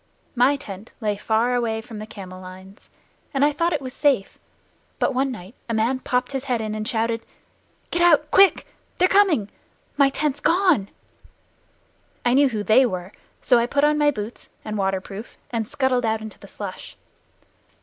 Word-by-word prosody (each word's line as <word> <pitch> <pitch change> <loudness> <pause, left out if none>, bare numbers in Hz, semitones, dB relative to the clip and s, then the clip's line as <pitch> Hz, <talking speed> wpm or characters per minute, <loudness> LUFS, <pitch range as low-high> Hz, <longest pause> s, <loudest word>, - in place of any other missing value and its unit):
My 255 +3 +4
tent 205 -4 -9
lay 210 -3 -1
far 225 +4 +1
away 230 -2 0
from 225 -1 -9
the 215 - -7
camel 185 -3 -10
lines, 185 +2 -13 0.5
and 275 +1 +4
I 295 - +3
thought 335 +4 0
it 300 -4 -2
was 255 0 -6
safe. 275 -10 +1 0.6
But - - +1
one 265 +2 +1
night 200 -3 -9 0.2
a 230 - 0
man 235 +4 +1
popped 250 -1 -1
his 270 -1 -4
head 250 -4 0
in 215 -1 -3
and 215 0 -3
shouted, 230 -1 0 0.7
"Get 345 - 0
out, 305 -3 +4
quick! 390 0 +5 0.3
They're 365 - +4
coming! 370 - +3 0.5
My 280 -1 +5
tent's 290 0 -1
gone!" 340 - +2 1.4
I 240 - +3
knew 280 +1 +5
who 215 -4 -3
"they" 220 +5 +5
were, 185 -5 -3 0.3
so 245 - +5
I 235 - +1
put 280 +2 +1
on 300 0 +3
my 295 0 +4
boots 220 -4 -6 0.2
and 215 -1 -4
waterproof 195 +2 -3
and 225 -3 -2
scuttled 260 -1 0
out 220 -1 0
into 220 -1 -10
the - - -13
slush. - - -8
240 Hz, 180 wpm, -23 LUFS, 215-280 Hz, 1.4 s, quick